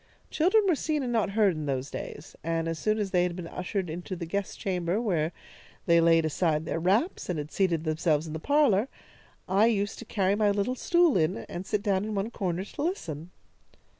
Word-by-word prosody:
"Children 385 +7 +3
were 360 - +4
seen 300 -1 -1
and 245 -1 -2
not 220 -3 +2
heard 205 -4 +5
in 155 -2 -5
those 135 0 -2
days 145 - -7
and 165 0 -1
as 165 -1 -3
soon 215 0 +1
as 205 -3 -2
they 180 - +3
had 175 -1 0
been 180 -2 -6
ushered 180 +2 -3
into 175 +3 -5
the 170 -1 -5
guest 200 +4 -3
chamber, 180 0 -1
where 170 -9 0 0.5
they 170 -1 +5
laid 165 -1 +4
aside 155 0 0
their 165 - -2
wraps, 200 - +1
and 175 - -1
had 150 0 -5
seated 175 -5 +1
themselves 155 -1 +1
in 155 - -6
the 160 - -4
parlour, 270 - +3 0.6
I 195 +4 +4
used 205 -2 0
to 235 - -8
carry 195 -3 +1
my 210 0 +2
little 205 +4 0
stool 345 - +3
in 155 -6 +1
and 180 +3 -6
sit 205 -1 -1
down 195 -2 +1
in 215 0 -3
one 200 +4 -2
corner 185 -3 -2
to - - -7
listen. 175 - -3
190 Hz, 215 wpm, -28 LUFS, 165-215 Hz, 0.6 s, heard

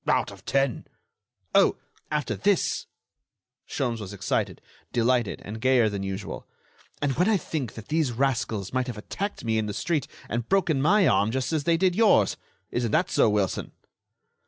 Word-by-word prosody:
"Out - - +2
of - - -14
ten." 135 -3 0 0.7
"Oh! - - +5 0.3
after 150 -1 -1
this——" 200 -2 +1 0.8
Sholmes 120 -4 -2
was 105 -2 -7
excited, 100 - -1 0.3
delighted, 120 -2 +1
and 110 +3 -7
gayer 130 -3 +4
than 100 -1 -4
usual. 95 +1 -5 0.6
"And 145 - +2
when 180 +5 +3
I 215 - +4
think 150 - -4
that 110 - -10
these 155 -4 +1
rascals 115 -5 -1
might 130 0 0
have 120 -4 -5
attacked 200 - -5
me 110 -1 +1
in 110 - -1
the 105 - -4
street 145 +5 -1 0.2
and 120 0 -3
broken 175 -8 +2
my 190 +5 +4
arm 105 - +3
just 130 +6 -1
as 150 -3 0
they 170 -1 +3
did 185 0 +2
yours! 200 - +4 0.4
Isn't 120 -1 0
that 170 +3 +2
so, 140 -6 +4
Wilson?" 105 -4 -1
130 Hz, 170 wpm, -26 LUFS, 110-160 Hz, 0.8 s, Oh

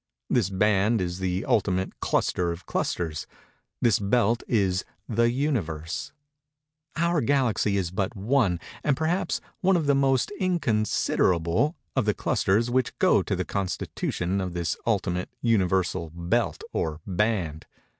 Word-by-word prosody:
This 115 -6 +2
band 105 +3 +2
is 90 0 -3
the 95 +3 -1
ultimate 95 -3 0
cluster 85 -1 0
of 85 +1 -7
clusters. 80 -3 -2 0.6
This 115 - +4
belt 115 +3 +2
is 95 -5 +1 0.2
The 115 +1 +2
Universe. 100 - -2 0.8
Our 170 -1 +2
Galaxy 120 -6 +2
is 90 -3 -1
but 95 +4 -2
one, 105 -4 +1 0.2
and 140 -3 +2
perhaps 165 +4 0 0.2
one 190 +1 +3
of 160 - -1
the 140 - +4
most 135 - +2
inconsiderable, 110 - +1 0.2
of 130 -5 +2
the 105 - +1
clusters 115 +5 +1
which 130 0 0
go - - +4
to - - -2
the - - -2
constitution 95 -1 -2
of 90 -2 -3
this 85 -3 -1
ultimate, 90 -5 0
Universal 95 -6 +1
belt 85 0 0
or 80 -1 -2
band. 90 -5 -1
100 Hz, 135 wpm, -26 LUFS, 90-120 Hz, 0.8 s, This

